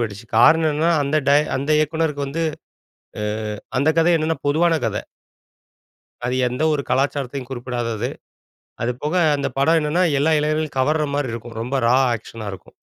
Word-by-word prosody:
பெற்றுச்சு. 110 Hz, -1 st, -4 dB
காரணம் 160 Hz, +7 st, +5 dB
என்னன்னா 160 Hz, +3 st, +1 dB
அந்த 140 Hz, +2 st, 0 dB
ட -, -, +5 dB, 0.2 s
அந்த 140 Hz, +3 st, -4 dB
இயக்குனருக்கு 155 Hz, -2 st, -1 dB
வந்து 155 Hz, +5 st, -3 dB, 0.8 s
அ -, -, -3 dB, 0.6 s
அந்த 145 Hz, +4 st, +3 dB
கதை 170 Hz, +2 st, +4 dB
என்னென்னா 160 Hz, -1 st, -1 dB
பொதுவான 165 Hz, +2 st, +2 dB
கதை. 105 Hz, -2 st, -2 dB, 1.2 s
அது 125 Hz, +1 st, -1 dB
எந்த 125 Hz, +5 st, -2 dB
ஒரு 145 Hz, -, 0 dB
கலாச்சாரத்தையும் 135 Hz, 0 st, -1 dB
குறிப்பிடாதது. 120 Hz, -2 st, -3 dB, 0.7 s
அது 120 Hz, -, 0 dB
போக, 150 Hz, +2 st, -2 dB, 0.2 s
அந்த 140 Hz, -, -1 dB
படம் 160 Hz, +4 st, +4 dB
என்னென்னா 160 Hz, +5 st, +1 dB, 0.2 s
எல்லா 160 Hz, +3 st, +2 dB
இளைஞர்களையும் 155 Hz, -1 st, -1 dB
கவர்ற 150 Hz, +3 st, +2 dB
மாரி 140 Hz, -5 st, -1 dB
இருக்கும். 115 Hz, 0 st, -8 dB
ரொம்ப 125 Hz, +4 st, -3 dB
ரா 125 Hz, -, +5 dB, 0.2 s
ஆக்க்ஷனா 110 Hz, 0 st, -9 dB
இருக்கும். 95 Hz, -, -12 dB
140 Hz, 155 wpm, -21 LUFS, 120-155 Hz, 1.2 s, காரணம்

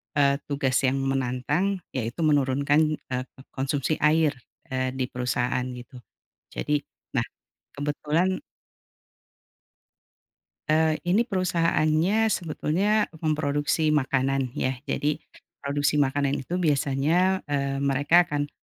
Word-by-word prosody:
eee, 140 Hz, -1 st, +3 dB
tugas 140 Hz, -3 st, +1 dB
yang 130 Hz, -, +1 dB
menantang 135 Hz, +8 st, -1 dB
yaitu 125 Hz, +6 st, -3 dB
menurunkan, 145 Hz, +1 st, +2 dB
eee, 130 Hz, -3 st, -5 dB
ko -, -, -21 dB
konsumsi 140 Hz, +2 st, -1 dB
air, 155 Hz, 0 st, +4 dB, 0.4 s
eee, 130 Hz, 0 st, -1 dB
di 130 Hz, -1 st, -2 dB
perusahaan 125 Hz, 0 st, -1 dB
gitu. 125 Hz, +1 st, -11 dB, 0.6 s
Jadi 150 Hz, 0 st, 0 dB, 0.3 s
nah, -, -, 0 dB, 0.5 s
kebetulan 155 Hz, +5 st, 0 dB, 2.3 s
Eee, 155 Hz, 0 st, +3 dB
ini 185 Hz, +6 st, +3 dB
perusahaannya 175 Hz, +1 st, +2 dB
sebetulnya 195 Hz, +2 st, +1 dB, 0.2 s
memproduksi 150 Hz, 0 st, +1 dB
makanan 135 Hz, -2 st, +1 dB
ya, 130 Hz, +1 st, 0 dB, 0.2 s
jadi 150 Hz, +1 st, -1 dB, 0.4 s
produksi 145 Hz, +1 st, +1 dB
makanan 140 Hz, 0 st, 0 dB
itu 175 Hz, +7 st, -3 dB
biasanya, 160 Hz, +4 st, +1 dB
eee, 140 Hz, -2 st, -1 dB
mereka 145 Hz, +5 st, +3 dB
akan, 145 Hz, -3 st, -2 dB
145 Hz, 105 wpm, -26 LUFS, 135-160 Hz, 2.3 s, air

